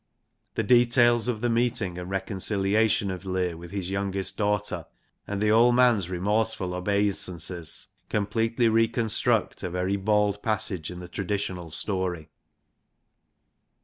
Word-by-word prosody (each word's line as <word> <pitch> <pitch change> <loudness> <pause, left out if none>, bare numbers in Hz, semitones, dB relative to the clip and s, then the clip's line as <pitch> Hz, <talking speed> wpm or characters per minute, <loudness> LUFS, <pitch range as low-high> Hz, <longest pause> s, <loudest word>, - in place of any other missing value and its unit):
The - - 0
details 120 -1 +4
of 115 -3 -1
the 120 - +1
meeting 115 -6 0
and 90 +1 -7
reconciliation 100 +2 +1
of 95 0 -6
Leir 90 -2 -1
with 85 +1 -10
his 95 -1 -4
youngest 100 -1 -1
daughter, 105 -1 -1 0.4
and 100 -1 -3
the 105 +1 +2
old 120 +2 +5
man's 120 -8 +4
remorseful 100 +1 0
obeisances 90 -3 -1 0.2
completely 115 +3 +1
reconstruct 115 0 +1
a 90 - -3
very 90 +3 -1
bald 105 0 +1
passage 110 -7 -2
in 90 0 -8
the 90 - -8
traditional 95 -2 -3
story. 90 -2 -3
100 Hz, 125 wpm, -26 LUFS, 90-110 Hz, 0.4 s, old